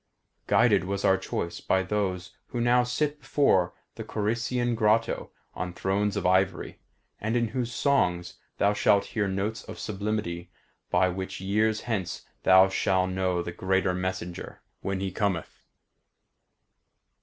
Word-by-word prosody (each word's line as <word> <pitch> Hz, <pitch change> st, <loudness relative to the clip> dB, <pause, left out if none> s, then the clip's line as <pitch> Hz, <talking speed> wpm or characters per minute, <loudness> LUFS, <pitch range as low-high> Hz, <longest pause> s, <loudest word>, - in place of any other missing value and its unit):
Guided 85 Hz, -, +4 dB
was 100 Hz, +1 st, -2 dB
our 95 Hz, -, +5 dB
choice 85 Hz, -2 st, -4 dB
by 95 Hz, 0 st, +1 dB
those 95 Hz, -2 st, -2 dB
who 120 Hz, -, -4 dB
now 120 Hz, +1 st, +4 dB
sit 145 Hz, +4 st, -1 dB
before 135 Hz, -, +2 dB, 0.2 s
the -, -, -7 dB
Corycian 120 Hz, +3 st, -1 dB
grotto 110 Hz, 0 st, +1 dB, 0.2 s
on 90 Hz, 0 st, -4 dB
thrones 100 Hz, +2 st, 0 dB
of -, -, -2 dB
ivory, 95 Hz, +1 st, +1 dB, 0.4 s
and 110 Hz, +3 st, -1 dB
in 120 Hz, -2 st, +1 dB
whose 125 Hz, 0 st, -2 dB
songs 90 Hz, -10 st, +1 dB, 0.2 s
thou 100 Hz, +1 st, +3 dB
shalt 100 Hz, -1 st, +3 dB
hear 105 Hz, -4 st, +1 dB
notes 100 Hz, +4 st, -2 dB
of -, -, -8 dB
sublimity 100 Hz, -4 st, -3 dB, 0.4 s
by 95 Hz, -, +3 dB
which 95 Hz, +1 st, -4 dB
years 110 Hz, +3 st, +1 dB
hence 105 Hz, -7 st, -3 dB, 0.2 s
thou 95 Hz, +1 st, +7 dB
shall 95 Hz, -1 st, +1 dB
know 95 Hz, -1 st, -1 dB
the 85 Hz, -, -5 dB
greater 95 Hz, +1 st, +1 dB
messenger 90 Hz, -1 st, -5 dB, 0.2 s
when 95 Hz, -1 st, -2 dB
he 95 Hz, -1 st, -2 dB
cometh. 95 Hz, -4 st, -2 dB
95 Hz, 140 wpm, -27 LUFS, 95-110 Hz, 0.4 s, thou